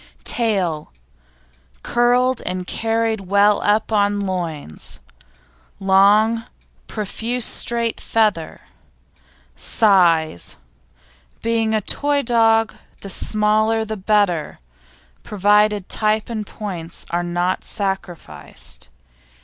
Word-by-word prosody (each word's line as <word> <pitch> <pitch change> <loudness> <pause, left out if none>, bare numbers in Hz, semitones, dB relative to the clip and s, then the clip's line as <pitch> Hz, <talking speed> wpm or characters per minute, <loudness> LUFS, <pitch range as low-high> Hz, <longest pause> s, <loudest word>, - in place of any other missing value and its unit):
TAIL 190 -10 0 0.9
Curled 245 +1 +2
and 180 0 -4
carried 225 +1 -1
well 200 +2 +3
up 215 +2 +1
on 205 -1 +2
loins; 170 - -5 0.8
long, 205 +4 +4 0.4
profuse 225 +3 -3
straight 235 -1 0
feather. 210 -8 0 0.9
SIZE 165 - +2 0.9
Being 225 -1 +1
a 215 - +1
toy 285 +6 0
dog 225 -2 +3 0.3
the 195 - -5
smaller 215 +2 +1
the 220 0 -4
better, 195 -5 0 0.6
provided 210 0 +2
type 215 0 +1
and 215 -3 -4
points 175 -6 -6
are 175 +1 0
not 175 +1 -1
sacrificed. 175 - -4
210 Hz, 85 wpm, -20 LUFS, 185-225 Hz, 0.9 s, long